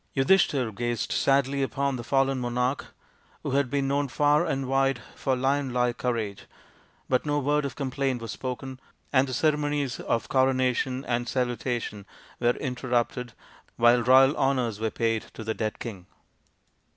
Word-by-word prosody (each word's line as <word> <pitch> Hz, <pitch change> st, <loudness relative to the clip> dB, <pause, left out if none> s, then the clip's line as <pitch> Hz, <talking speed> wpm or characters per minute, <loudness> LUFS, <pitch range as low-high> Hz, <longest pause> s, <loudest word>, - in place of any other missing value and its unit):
Yudhishthir 135 Hz, -4 st, +3 dB
gazed 120 Hz, +2 st, -2 dB
sadly 140 Hz, 0 st, +2 dB
upon 140 Hz, 0 st, -1 dB
the 120 Hz, -, -5 dB
fallen 135 Hz, +1 st, +1 dB
monarch, 125 Hz, +2 st, -1 dB, 0.6 s
who -, -, -2 dB
had 140 Hz, -1 st, +1 dB
been 140 Hz, +1 st, 0 dB
known 140 Hz, +1 st, +1 dB
far 145 Hz, +4 st, +3 dB
and 135 Hz, -3 st, -1 dB
wide 135 Hz, -1 st, +2 dB
for 130 Hz, -, -1 dB
lion 135 Hz, +1 st, 0 dB
like 125 Hz, -1 st, 0 dB
courage, 115 Hz, -5 st, -2 dB, 0.6 s
but 125 Hz, -, +1 dB
no 145 Hz, -1 st, 0 dB
word 145 Hz, +1 st, +1 dB
of 140 Hz, -, -4 dB
complaint 135 Hz, -2 st, -1 dB
was 115 Hz, -2 st, -6 dB
spoken, 130 Hz, 0 st, -5 dB, 0.3 s
and 135 Hz, 0 st, +4 dB
the 130 Hz, -, -5 dB
ceremonies 145 Hz, -2 st, 0 dB
of 115 Hz, -, -1 dB
coronation 130 Hz, 0 st, +1 dB
and 120 Hz, 0 st, -1 dB
salu 125 Hz, -1 st, 0 dB
tation 115 Hz, -5 st, -4 dB, 0.3 s
were 120 Hz, 0 st, +2 dB
interrupted 125 Hz, -2 st, -2 dB, 0.4 s
while 120 Hz, +1 st, +5 dB
royal 130 Hz, +3 st, +6 dB
honours 125 Hz, -6 st, 0 dB
were 110 Hz, 0 st, 0 dB
paid 115 Hz, 0 st, 0 dB
to 110 Hz, -, -7 dB
the 110 Hz, 0 st, -2 dB
dead 110 Hz, -1 st, -3 dB
king. 95 Hz, -7 st, -8 dB
130 Hz, 155 wpm, -26 LUFS, 120-135 Hz, 0.6 s, royal